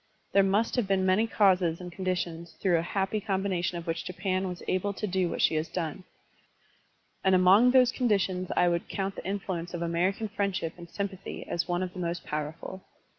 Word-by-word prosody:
There 195 - +5
must 200 +6 +1
have 235 -5 +1
been 190 -1 +2
many 190 +5 +3
causes 185 -6 +3
and 180 -1 -7
conditions 175 -2 -3
through 175 -4 +3
a - - 0
happy 195 +4 -1
combination 190 -3 -1
of 170 - -6
which 165 -1 -2
Japan 185 +1 -2
was 180 -1 -6
able 195 +2 0
to 210 - -3
do 185 -2 0
what - - -1
she - - +4
has 155 +1 0
done; 175 +1 -4 1.2
and 190 -1 +5
among 190 +7 +6
those 250 -1 +5
con 250 -2 0
ditions 185 -3 +1
I 180 - +5
would 170 -1 0
count 195 0 -2
the - - -8
influence 185 -3 -3
of 170 - -3
American 180 +6 0
friendship 200 -6 -2
and 170 -1 -11
sympathy 195 -1 -5
as 170 - -1
one 175 +1 0
of 180 -1 -5
the 185 - -7
most 170 0 -3
powerful. 155 +5 -5
185 Hz, 200 wpm, -28 LUFS, 175-195 Hz, 1.2 s, among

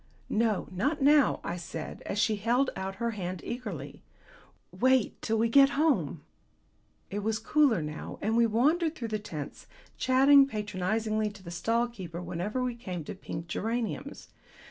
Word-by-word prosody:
"No, 220 -2 +1
not 275 - 0
now," 290 0 +4
I 175 - -3
said, 165 -2 -7
as 195 - -3
she 215 0 +2
held 240 +6 +1
out 190 0 -4
her 235 +2 -1
hand 185 -4 -4
eagerly. 205 - -6 0.7
"Wait 255 +5 +2
till 225 - 0
we 225 +1 +3
get 275 +4 +5
home." 310 -1 +1 0.9
It 205 - -2
was 215 +1 0
cooler 275 - +3
now, 150 +1 -6
and 220 +2 0
we 235 0 +5
wandered 310 +9 +2
through 230 -2 -5
the 215 0 -1
tents, 155 -8 -7 0.3
chatting 270 +2 +6
patronizingly 215 0 -1
to 205 -2 -14
the 170 - -8
stall 230 +7 +1
keeper 185 -8 -8
whenever 180 +8 -3
we 250 -1 -1
came 185 -8 -6
to - - -6
pink 165 -3 -7
geraniums. 220 -2 -3
220 Hz, 160 wpm, -29 LUFS, 185-250 Hz, 0.9 s, chatting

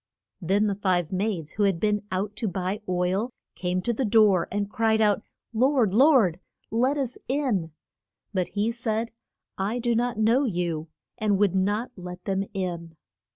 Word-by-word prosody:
Then 195 +5 +2
the 205 - +1
five 185 -4 0
maids 185 -5 -1
who 210 - -1
had 195 -4 +1
been 210 +1 +1
out 200 +3 -2
to 225 - -1
buy 190 +3 -2
oil 185 +5 0 0.2
came 180 0 -2
to 235 - 0
the 245 - -1
door, 210 -5 +4
and 205 0 -1
cried 220 +1 +1
out, 210 -1 +3 0.3
Lord, 245 -3 +3
Lord, 230 - +5 0.3
let 255 +6 +2
us 260 -3 -2
in. 245 - 0 0.6
But 185 -2 0
he 215 +3 +2
said, 230 -1 -2 0.5
I 205 +5 -1
do 240 -1 0
not 240 0 0
know 230 +5 +3
you; 170 -6 -2 0.3
and 210 -2 +2
would 200 -2 +3
not 205 +6 0
let 180 -1 -9
them 195 0 0
in. 170 -3 -4
205 Hz, 165 wpm, -26 LUFS, 185-230 Hz, 0.6 s, Lord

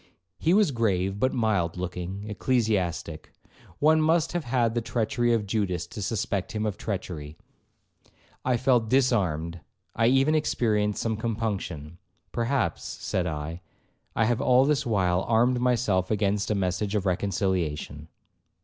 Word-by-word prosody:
He 170 +3 +3
was 205 -7 +4
a - - -8
grave, 100 -4 0
but 130 - +2
mild 100 -8 0
looking 90 +3 -5
ecclesiastic; 100 -8 -1 0.5
one 155 +1 +4
must 160 +1 +2
have 175 -4 -2
had 120 -2 +1
the 120 - 0
treachery 120 +1 0
of 115 -3 +1
Judas 95 -5 -1
to 95 +5 -8
suspect 100 -2 -2
him 110 0 -1
of 105 -3 -1
treachery. 85 -8 -5 1.1
I 125 -1 +2
felt 120 -3 +2
disarmed, 90 - +1 0.4
I 115 0 +3
even 135 +4 +4
experienced 105 -9 +1
some 110 -2 -1
compunction. 100 -8 -3 0.3
'Perhaps,' 120 +2 -1 0.2
said 90 -1 -1
I, 80 +2 -4 0.5
'I 115 - +3
have 120 +2 +1
all 130 -1 +5
this 145 -3 +1
while 95 -5 +2
armed 120 +2 +3
myself 115 -7 +1
against 105 -1 0
a 105 - +1
message 100 +2 -1
of 100 -2 0
reconciliation.' 90 -6 -1
105 Hz, 140 wpm, -26 LUFS, 90-120 Hz, 1.1 s, all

